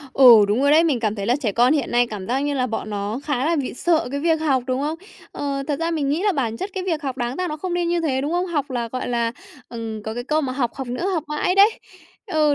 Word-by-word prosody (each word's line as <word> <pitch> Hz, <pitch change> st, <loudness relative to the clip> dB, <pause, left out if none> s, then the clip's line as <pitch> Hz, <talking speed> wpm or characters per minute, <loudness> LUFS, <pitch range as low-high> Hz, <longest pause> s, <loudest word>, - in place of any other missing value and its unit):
Ừ, 240 Hz, -6 st, +8 dB
đúng 210 Hz, +5 st, +1 dB
rồi 285 Hz, -, +4 dB
đấy. 320 Hz, +3 st, +6 dB
Mình 280 Hz, -7 st, +1 dB
cảm 215 Hz, -2 st, 0 dB
thấy 200 Hz, -2 st, -4 dB
là 245 Hz, -, +3 dB
trẻ 240 Hz, -8 st, -2 dB
con 245 Hz, +5 st, +4 dB
hiện 290 Hz, -5 st, 0 dB
nay 240 Hz, 0 st, +3 dB
cảm 205 Hz, -4 st, -7 dB
giác 260 Hz, +5 st, 0 dB
như 290 Hz, 0 st, -1 dB
là 255 Hz, -2 st, 0 dB
bọn 225 Hz, -2 st, -4 dB
nó 205 Hz, +3 st, -3 dB
khá 280 Hz, -2 st, -1 dB
là 335 Hz, 0 st, +2 dB
bị 275 Hz, -3 st, -3 dB
sợ 330 Hz, +1 st, +1 dB
cái 280 Hz, +1 st, -3 dB
việc 320 Hz, 0 st, +1 dB
học, 270 Hz, -5 st, +1 dB
đúng 255 Hz, 0 st, -1 dB
không? 305 Hz, +3 st, -2 dB, 0.3 s
Ờ, 280 Hz, -1 st, -3 dB
thật 290 Hz, -, -1 dB
ra 330 Hz, 0 st, 0 dB
mình 300 Hz, -4 st, -1 dB
nghĩ 305 Hz, +6 st, 0 dB
là 415 Hz, -1 st, +2 dB
bản 235 Hz, -8 st, -1 dB
chất 385 Hz, -, -5 dB
cái 375 Hz, -, -3 dB
việc 325 Hz, -4 st, -1 dB
học 265 Hz, -3 st, -3 dB
đáng 245 Hz, 0 st, -3 dB
ra 365 Hz, 0 st, -2 dB
nó 305 Hz, -, -4 dB
không 350 Hz, +3 st, -4 dB
nên 350 Hz, -1 st, 0 dB
như 345 Hz, 0 st, +1 dB
thế, 275 Hz, -5 st, 0 dB
đúng 290 Hz, +4 st, -2 dB
không? 355 Hz, +1 st, 0 dB
Học 290 Hz, -6 st, -2 dB
là, 240 Hz, -2 st, -2 dB
gọi 255 Hz, -, -3 dB
là, 235 Hz, -1 st, 0 dB, 0.4 s
ừm, 225 Hz, -2 st, -6 dB
có 220 Hz, +1 st, -5 dB
cái 245 Hz, +1 st, -5 dB
câu 305 Hz, +4 st, +1 dB
mà: 265 Hz, -3 st, -2 dB
"Học, 250 Hz, -3 st, -1 dB
học 265 Hz, -2 st, -6 dB
nữa, 250 Hz, +10 st, -3 dB
học 325 Hz, -, -1 dB
mãi" 300 Hz, +5 st, 0 dB
đấy. 400 Hz, +3 st, +7 dB, 0.6 s
Ừ, 305 Hz, -2 st, +3 dB
275 Hz, 300 wpm, -22 LUFS, 240-315 Hz, 0.6 s, Ừ